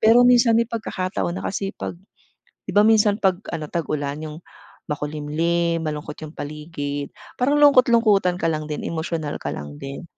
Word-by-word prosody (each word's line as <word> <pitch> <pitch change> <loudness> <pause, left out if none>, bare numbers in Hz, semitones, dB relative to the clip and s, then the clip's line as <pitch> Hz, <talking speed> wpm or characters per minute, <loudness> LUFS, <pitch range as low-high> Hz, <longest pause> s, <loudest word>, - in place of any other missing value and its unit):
Pero 235 +3 +6
minsan 240 -2 +5
may 235 - +4
pagkakataon 185 - -3
na 95 - -5
kasi 195 - -2
pag - - -4 0.7
'di - - -5
ba, 205 - +6
minsan 215 -1 +4
pag 190 -2 +3 0.2
ano 155 -2 -4
tag-ulan 145 -3 -2
yung 155 0 -7 0.5
makulimlim 160 +3 -1
malungkot 150 -1 -4
yung 155 - -11
paligid 145 -1 -5 0.2
parang 285 +4 +2
lungkot-lungkutan 230 -9 +5
ka 165 - +2
lang 155 -1 -3
din 150 -1 -4
emosyonal 160 -2 -3
ka - - -4
lang 75 0 -8
din. 135 - -7
165 Hz, 160 wpm, -22 LUFS, 150-215 Hz, 0.7 s, Pero